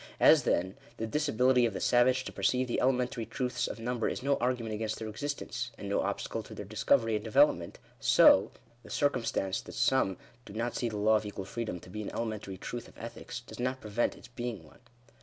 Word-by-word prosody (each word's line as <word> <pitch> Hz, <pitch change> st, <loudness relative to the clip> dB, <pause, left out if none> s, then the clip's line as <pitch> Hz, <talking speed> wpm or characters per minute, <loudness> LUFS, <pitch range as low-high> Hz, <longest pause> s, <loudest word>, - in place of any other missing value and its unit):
As, -, -, +6 dB
then, 95 Hz, +3 st, 0 dB, 0.2 s
the 115 Hz, -, -2 dB
disability 130 Hz, -1 st, +2 dB
of 105 Hz, -, -5 dB
the -, -, -2 dB
savage 125 Hz, +1 st, +3 dB
to -, -, -5 dB
perceive 125 Hz, 0 st, +1 dB
the 120 Hz, -, -1 dB
elementary 125 Hz, -2 st, +1 dB
truths 125 Hz, +3 st, -2 dB
of -, -, -6 dB
number 120 Hz, 0 st, -1 dB
is 125 Hz, -, -4 dB
no 140 Hz, 0 st, +3 dB
argument 120 Hz, -2 st, -1 dB
against 110 Hz, 0 st, -2 dB
their 110 Hz, -, -5 dB
existence, 125 Hz, 0 st, -4 dB
and 100 Hz, -, -7 dB
no 100 Hz, -, +1 dB
obstacle -, -, -2 dB
to -, -, -11 dB
their 105 Hz, -, -6 dB
discovery 115 Hz, +3 st, +2 dB
and 105 Hz, -1 st, -1 dB
development, 110 Hz, -, +3 dB, 0.2 s
so, -, -, +6 dB, 0.3 s
the -, -, -14 dB
circumstance 115 Hz, -9 st, 0 dB
that -, -, -11 dB
some 115 Hz, -8 st, +2 dB, 0.3 s
do 100 Hz, -, -11 dB
not 115 Hz, +3 st, -2 dB
see 120 Hz, -, -1 dB
the 105 Hz, -, -5 dB
law 110 Hz, +1 st, +4 dB
of 105 Hz, -, -4 dB
equal 100 Hz, -1 st, -6 dB
freedom 105 Hz, -2 st, -4 dB
to 90 Hz, -, -13 dB
be 105 Hz, +2 st, -5 dB
an 105 Hz, -, -4 dB
elementary 110 Hz, -4 st, -4 dB
truth 120 Hz, +4 st, -6 dB
of -, -, -18 dB
ethics, 115 Hz, +1 st, -7 dB
does 120 Hz, -, -12 dB
not 130 Hz, +1 st, -1 dB
prevent 110 Hz, +1 st, -1 dB
its 120 Hz, -, -14 dB
being 120 Hz, -6 st, -5 dB
one. 75 Hz, -, -18 dB
115 Hz, 215 wpm, -31 LUFS, 105-125 Hz, 0.3 s, As